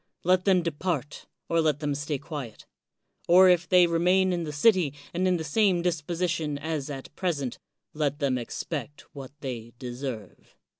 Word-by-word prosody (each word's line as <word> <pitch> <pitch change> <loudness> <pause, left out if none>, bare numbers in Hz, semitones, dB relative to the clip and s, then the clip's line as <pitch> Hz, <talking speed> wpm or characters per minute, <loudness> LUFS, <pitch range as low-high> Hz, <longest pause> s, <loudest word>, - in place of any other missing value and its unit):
Let 185 +1 +3
them 185 -3 +4
depart, 160 -3 -3 0.2
or 165 0 +2
let 155 -3 +1
them 150 -2 -1
stay 145 +1 -2
quiet; 135 -6 -8 0.6
or 185 +2 +7
if 175 -1 +3
they 180 -1 +6
remain 180 +3 +2
in 170 -2 -2
the 150 - -4
city 155 -1 +3 0.2
and 185 +2 +1
in 180 -1 +2
the 160 - -4
same 180 +2 +2
disposition 170 -2 -1
as 150 -1 -3
at 135 0 -8
present, 145 -9 -2 0.3
let 145 -2 -1
them 135 -4 0
expect 145 +3 -5
what 135 -3 -8
they 120 -4 -6
deserve. 125 -5 -7
155 Hz, 160 wpm, -27 LUFS, 140-175 Hz, 0.6 s, or